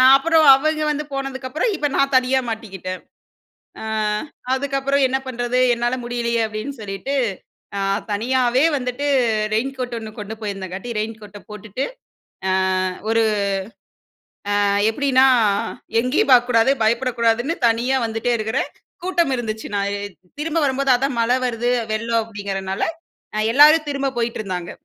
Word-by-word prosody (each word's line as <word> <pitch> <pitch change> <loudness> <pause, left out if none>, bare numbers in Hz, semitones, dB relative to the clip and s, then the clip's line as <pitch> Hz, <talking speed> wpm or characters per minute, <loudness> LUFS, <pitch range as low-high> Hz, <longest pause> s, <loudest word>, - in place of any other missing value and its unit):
அப்புறம் 320 +3 +4
அவங்க 310 +3 +1
வந்து 300 0 -2
போனதுக்கப்புறம், 270 - -2
இப்ப 295 -3 0
நான் 275 0 +2
தனியா 260 +1 +3
மாட்டிக்கிட்டேன். 190 -5 -6 0.8
அ - - -6 0.7
அதுக்கப்புறம் 275 +1 0
"என்ன 260 +1 0
பண்றது? 245 0 -1
என்னால 240 +1 0
முடியலையே" 235 -1 -1
அப்டின்னு 220 +6 -5
சொல்லிட்டு 205 +7 -4 0.6
அ - - -1 0.3
தனியாவே 250 +4 +2
வந்துட்டு 250 +2 -3 0.5
ரெயின்கோட் 250 +2 -2
1 220 - -7
கொண்டு 210 +1 -6
போயிருந்தங்காட்டி 195 0 -5
ரெயின்கோட்ட 215 -2 -6
போட்டுட்டு, 210 +4 -5 0.7
அ - - +2 0.6
ஒரு 225 0 +3 1.4
அ - - +2 0.2
எப்டின்னா 265 +2 +3 0.7
எங்கேயும் 255 +3 +1
பாக்கக்கூடாது, 245 0 +5
பயப்படக்கூடாதுன்னு 235 +4 +1
தனியா 240 +4 +1
வந்துட்டே 225 +2 -1
இருக்கிறேன். 220 +4 -2 0.3
கூட்டம் 345 -6 +1
இருந்துச்சு. 220 -2 -4
நான் 200 0 0
எ - - -6 0.4
திரும்ப 325 +2 -1
வரும்போது 275 0 +1
அதான் 270 0 -2
மழ 230 +1 +1 0.2
வருது 240 0 -1 0.2
வெள்ளம் 230 +1 0
அப்படிங்கிறதுனால 195 -3 -4 0.5
அ - - +1
எல்லாரும் 305 +2 +7
திரும்ப 275 -1 -1
போயிட்டு 230 -1 -1
இருந்தாங்க. 180 -4 -5
245 Hz, 125 wpm, -21 LUFS, 220-270 Hz, 1.4 s, எல்லாரும்